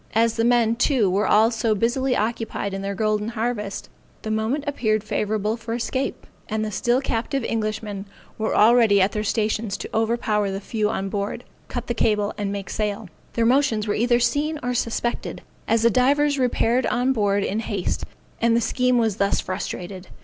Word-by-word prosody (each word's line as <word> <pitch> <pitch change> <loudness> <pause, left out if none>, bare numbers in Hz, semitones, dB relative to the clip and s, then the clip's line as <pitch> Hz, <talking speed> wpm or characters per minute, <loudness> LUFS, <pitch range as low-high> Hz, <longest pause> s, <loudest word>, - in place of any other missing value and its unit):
As 230 0 +3
the 225 - +1
men, 235 -1 +3
too, 245 -7 +2
were 200 +3 +1
all 220 +2 +5
so 225 -1 +1
busily 245 +4 +1
occupied 220 -3 -2
in 195 - -3
their 200 0 -3
golden 215 0 0
harvest, 225 -3 -3 0.4
the 220 - -3
moment 220 +7 0
appeared 215 -7 0
favorable 215 0 -1
for 230 0 -5
escape; 260 +3 -3 0.2
and 215 0 -1
the 215 - -4
still 240 +4 +1
captive 270 +2 -2
Englishmen 215 -3 -3 0.3
were 220 0 -1
already 220 -2 +5
at 190 +1 +3
their 210 - -2
stations 215 -1 -1
to - - -6
overpower 220 -2 +1
the 195 0 -3
few 210 +1 -1
on 195 -2 -2
board, 200 +4 -3 0.2
cut 245 -1 -4
the 240 - -2
cable, 210 -2 +1
and 205 -1 -3
make 200 -1 -5
sail. 210 -1 -2 0.2
Their 230 - +1
motions 245 -4 +2
were 205 - +1
either 240 +1 +2
seen 295 +5 0
or 250 0 -1
suspected, 240 0 -2 0.2
as 225 0 +2
the 235 - +5
divers 285 +4 +3
repaired 245 0 +2
on 250 +2 +1
board 205 -3 +1
in 205 +3 -1
haste, 205 -5 -2 0.4
and 230 0 +4
the - - +4
scheme 250 +1 +1
was 220 -4 +1
thus 200 0 +1
frustrated. 185 0 -5
225 Hz, 185 wpm, -23 LUFS, 210-240 Hz, 0.4 s, all